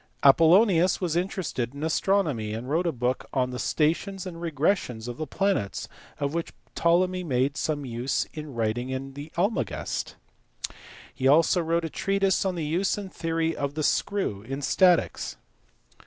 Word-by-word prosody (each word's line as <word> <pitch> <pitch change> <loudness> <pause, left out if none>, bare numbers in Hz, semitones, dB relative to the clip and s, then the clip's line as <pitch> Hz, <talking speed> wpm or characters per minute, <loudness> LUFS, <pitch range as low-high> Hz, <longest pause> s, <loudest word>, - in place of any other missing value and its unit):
Apollonius 170 +5 +6
was 175 -4 -1
interested 165 - -2
in 145 - -6
astronomy, 155 - +1
and 115 +3 -5
wrote 165 +5 +1
a - - +2
book 125 -1 -1
on 125 -1 +1
the 125 - -5
stations 175 +5 0
and 180 -3 -6
regressions 155 - -1
of 120 0 -5
the 155 - -4
planets 130 - -1 0.3
of 140 0 -1
which 170 0 -3 0.2
Ptolemy 180 +2 +2
made 135 -2 0
some 145 -2 -2
use 120 +2 -1
in 150 -4 -7
writing 125 +4 -2
the 145 +3 -8
Almagest. 200 +6 -1 1.0
He 130 +1 0
also 165 +5 +5
wrote 165 0 0
a - - -3
treatise 195 +4 +1
on 185 -1 0
the 165 -3 -2
use 175 +7 0
and 200 -2 -7
theory 165 0 -1
of 140 0 -3
the 155 - -1
screw 190 - 0
in 135 +6 -5
statics. 180 +3 +2
160 Hz, 155 wpm, -26 LUFS, 130-180 Hz, 1.0 s, Apollonius